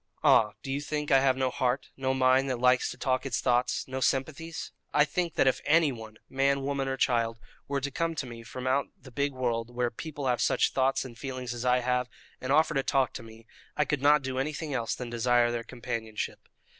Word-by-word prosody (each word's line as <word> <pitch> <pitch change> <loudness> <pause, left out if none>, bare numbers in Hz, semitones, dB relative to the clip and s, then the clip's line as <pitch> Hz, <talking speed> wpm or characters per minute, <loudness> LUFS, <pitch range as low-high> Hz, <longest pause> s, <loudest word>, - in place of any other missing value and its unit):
"Ah, 105 -1 +5
do 135 - -4
you 140 +2 -1
think 150 0 -3
I 135 - +7
have 130 -1 +2
no 130 -1 +1
heart, 125 +2 -1
no 130 0 -1
mind 130 +1 +3
that 130 - -1
likes 125 0 +3
to - - -7
talk 130 0 0
its 135 - -1
thoughts, 125 -1 +1
no 130 0 -4
sympathies? 155 +6 -2 0.2
I 150 0 +4
think 170 +2 -2
that - - +3
if 130 - +2
anyone 130 -9 +1
man, 135 +1 +1
woman, 140 -1 -1
or 135 0 -2
child 115 -3 +1 0.3
were 140 0 -1
to 140 +1 -3
come 165 +3 -1
to 145 - -3
me 120 -2 -9
from 120 +2 -8
out 130 +2 +1
the 130 - -14
big 140 +3 0
world, 120 -3 -2
where 120 -1 0
people 145 +2 -6
have 125 -2 +1
such - - +2
thoughts 135 0 +1
and 120 -2 -9
feelings 130 -2 -4
as 120 +1 -5
I 125 0 +3
have, 125 0 0 0.3
and 130 - -2
offer 155 +2 +4
to 135 - +2
talk 135 -1 +1
to - - -6
me, 115 0 -14 0.3
I 150 - +3
could 140 0 -1
not 145 0 +5
do 130 0 -2
anything 150 +2 -3
else 115 -3 -1
than 125 -2 -6
desire 120 0 +3
their 120 0 -2
companionship. 115 -2 -5
130 Hz, 225 wpm, -29 LUFS, 120-140 Hz, 0.3 s, I